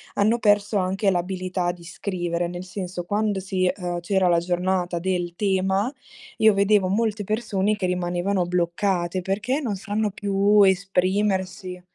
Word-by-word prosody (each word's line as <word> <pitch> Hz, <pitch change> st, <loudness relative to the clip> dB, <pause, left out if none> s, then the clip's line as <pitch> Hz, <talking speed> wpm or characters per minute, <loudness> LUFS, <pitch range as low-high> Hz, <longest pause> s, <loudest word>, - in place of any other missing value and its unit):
hanno 215 Hz, +3 st, +3 dB
perso 205 Hz, -1 st, +2 dB
anche 195 Hz, +2 st, +1 dB
l'abilità 185 Hz, 0 st, -1 dB
di 175 Hz, -1 st, -13 dB
scrivere. 175 Hz, -1 st, -3 dB
Nel 175 Hz, +1 st, -6 dB
senso, 180 Hz, -1 st, -5 dB
quando 205 Hz, +1 st, 0 dB
si 185 Hz, -1 st, -1 dB
ehm, 175 Hz, -2 st, -2 dB
c'era 190 Hz, +1 st, +1 dB
la 170 Hz, -1 st, +4 dB
giornata 180 Hz, 0 st, -1 dB
del 175 Hz, -1 st, -2 dB
tema, 195 Hz, +3 st, +1 dB, 0.5 s
io 220 Hz, -1 st, +6 dB
vedevo 200 Hz, -1 st, +3 dB
molte 215 Hz, +1 st, 0 dB
persone 215 Hz, -1 st, 0 dB
che 200 Hz, -, -2 dB
rimanevano 180 Hz, +1 st, 0 dB
bloccate 175 Hz, +1 st, 0 dB
perché 215 Hz, -, -1 dB
non 225 Hz, -8 st, -2 dB
sanno 210 Hz, +2 st, -2 dB
più 200 Hz, +1 st, +3 dB
esprimersi. 190 Hz, -1 st, 0 dB
190 Hz, 140 wpm, -24 LUFS, 180-205 Hz, 0.5 s, io